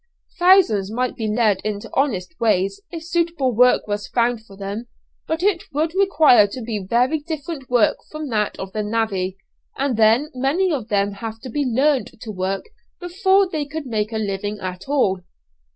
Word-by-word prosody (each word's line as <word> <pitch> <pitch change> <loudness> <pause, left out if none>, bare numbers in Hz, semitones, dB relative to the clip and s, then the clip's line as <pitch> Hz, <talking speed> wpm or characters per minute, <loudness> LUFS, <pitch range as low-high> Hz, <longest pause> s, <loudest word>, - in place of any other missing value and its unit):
Thousands 345 - +4
might 250 +2 -1
be 220 - -3
led 215 -3 +2
into 210 -1 -3
honest 260 - 0
ways 215 - +1
if 330 -2 -7
suitable 335 -6 0
work 250 +3 +4
was 205 0 -3
found 235 -1 0
for 195 -3 -15
them, 200 +4 -5 0.4
but 320 +2 -2
it 395 -4 +1
would 315 +3 0
require 310 - +5
to 245 +5 -7
be 220 -2 -3
very 250 +7 +2
different 300 -2 -6
work 245 -3 +3
from 305 -1 -6
that 210 -3 -1
of 190 0 -6
the 215 - -1
'navvy,' 205 -4 -1 0.4
and 270 -4 0
then 225 +8 +4
many 290 +9 +1
of 255 -7 -3
them 200 -2 +1
have 220 +2 -7
to 255 - -8
be 290 +4 0
learned 265 0 +1
to 220 -1 -7
work 190 0 -3 0.3
before 380 +2 +2
they 315 -4 -2
could 290 +1 -6
make 215 -3 -2
a 220 - -2
living 205 0 -3
at 185 0 -6
all." 225 -10 +2
240 Hz, 180 wpm, -21 LUFS, 210-305 Hz, 0.4 s, require